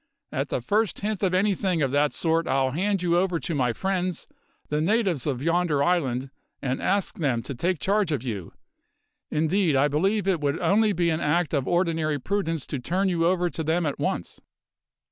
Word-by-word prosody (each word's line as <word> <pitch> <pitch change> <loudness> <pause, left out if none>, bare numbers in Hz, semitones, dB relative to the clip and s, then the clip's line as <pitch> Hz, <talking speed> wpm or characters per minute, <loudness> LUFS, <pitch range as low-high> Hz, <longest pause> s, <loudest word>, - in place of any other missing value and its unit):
At - - -2
the - - -1
first 210 - 0
hint 210 -1 -2
of 185 -2 +1
anything 190 -4 +1
of 135 - 0
that 145 +1 +2
sort 165 0 0
I'll 135 -1 +1
hand 190 +5 0
you 175 0 +3
over 180 -2 +1
to 165 - -3
my 125 -5 +1
friends, 185 +4 -2 0.4
the 150 +1 0
natives 185 - +1
of 135 -2 -2
yonder 165 -3 +2
island, 135 -6 0 0.3
and 130 -1 -2
ask 200 -1 0
them 130 -7 0
to - - -5
take 175 +8 -1
charge 200 0 +1
of 140 -5 -1
you; 100 -9 -5 0.8
indeed 160 +1 +1
I 135 +2 +4
believe 195 +7 0
it 185 -4 +2
would 140 -1 0
only 215 +1 +3
be 170 -3 +1
an 160 - 0
act 160 +1 +1
of 140 -3 0
ordinary 165 -4 +1
prudence 165 -1 -2
to 140 - -4
turn 185 +9 0
you 170 -2 +1
over 180 0 +2
to 160 - -4
them 165 +2 +1
at 145 - -2
once." - - -3
165 Hz, 195 wpm, -25 LUFS, 145-185 Hz, 0.8 s, I